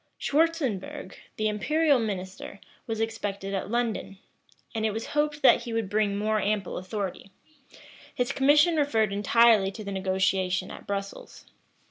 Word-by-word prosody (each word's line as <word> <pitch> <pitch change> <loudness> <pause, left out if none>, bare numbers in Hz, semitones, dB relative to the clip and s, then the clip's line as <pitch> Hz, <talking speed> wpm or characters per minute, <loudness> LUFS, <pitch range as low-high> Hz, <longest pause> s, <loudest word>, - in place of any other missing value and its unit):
Schwartzenbourg, 285 - -1 0.2
the 215 - 0
imperial 290 +7 +2
minister, 195 -2 -5 0.3
was 225 -1 -3
expected 205 -3 -3
at 195 0 -3
London; 230 -4 -2 0.6
and 220 -2 -2
it 220 - +2
was 225 +2 -4
hoped 295 0 0
that 265 - +6
he 235 -1 -6
would 225 -4 -2
bring 205 -1 +1
more 215 +1 0
ample 205 -3 -1
authority: 190 0 -5 0.9
his 245 +2 0
commission 295 +5 +4
referred 225 -9 +1
entirely 210 0 +4
to 205 +2 -8
the 200 - -5
negotiation 190 -1 0
at - - -11
Brussels. 200 0 -6
215 Hz, 140 wpm, -27 LUFS, 195-240 Hz, 0.9 s, that